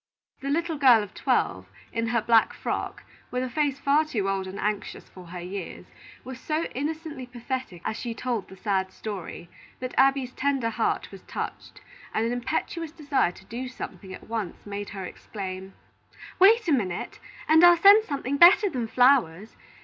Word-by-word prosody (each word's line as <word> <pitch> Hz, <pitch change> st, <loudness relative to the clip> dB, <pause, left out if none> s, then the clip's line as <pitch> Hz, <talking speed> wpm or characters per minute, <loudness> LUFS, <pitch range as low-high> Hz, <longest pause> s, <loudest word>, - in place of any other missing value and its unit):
The 275 Hz, -, -5 dB
little 325 Hz, +1 st, -1 dB
girl 245 Hz, -6 st, +6 dB
of 205 Hz, -, -10 dB
twelve, -, -, 0 dB, 0.3 s
in 230 Hz, 0 st, -1 dB
her 230 Hz, -1 st, 0 dB
black 225 Hz, -1 st, +4 dB
frock, -, -, -4 dB, 0.3 s
with 250 Hz, 0 st, -2 dB
a 255 Hz, -, -3 dB
face 290 Hz, -2 st, 0 dB
far 280 Hz, +2 st, +3 dB
too 225 Hz, -11 st, -2 dB
old 195 Hz, -1 st, -1 dB
and 190 Hz, +1 st, -7 dB
anxious 210 Hz, 0 st, -3 dB
for 180 Hz, -2 st, -13 dB
her 180 Hz, +1 st, -7 dB
years, 180 Hz, +1 st, -7 dB, 0.4 s
was 260 Hz, 0 st, -8 dB
so 310 Hz, +3 st, -1 dB
innocently 295 Hz, -1 st, -4 dB
pathetic 245 Hz, -7 st, -6 dB
as 220 Hz, -, -2 dB
she 235 Hz, -1 st, -5 dB
told 235 Hz, -6 st, -3 dB
the 190 Hz, -, -11 dB
sad 190 Hz, -2 st, -1 dB
story, 190 Hz, -5 st, -7 dB, 0.3 s
that 255 Hz, 0 st, -5 dB
Abby's 270 Hz, -1 st, +3 dB
tender 265 Hz, -4 st, 0 dB
heart -, -, -1 dB
was -, -, -11 dB
touched, -, -, -6 dB, 0.3 s
and 220 Hz, -, +1 dB
an 230 Hz, -, -1 dB
impetuous 310 Hz, +6 st, -3 dB
desire 285 Hz, -, 0 dB
to 190 Hz, -, -17 dB
do 245 Hz, +5 st, -5 dB
something 215 Hz, -6 st, -8 dB
at -, -, -10 dB
once 220 Hz, -5 st, -5 dB
made 205 Hz, 0 st, -5 dB
her 195 Hz, -2 st, -6 dB
exclaim: 190 Hz, -1 st, -7 dB, 0.6 s
"Wait 435 Hz, +3 st, +6 dB
a -, -, +2 dB
minute, 195 Hz, -10 st, -1 dB, 0.3 s
and 320 Hz, +2 st, +6 dB
I'll 350 Hz, 0 st, +8 dB
send 405 Hz, +5 st, +8 dB
something 280 Hz, -, -3 dB
better 370 Hz, +5 st, +7 dB
than 245 Hz, -4 st, -2 dB
flowers. 225 Hz, -7 st, +3 dB
245 Hz, 175 wpm, -26 LUFS, 200-285 Hz, 0.6 s, I'll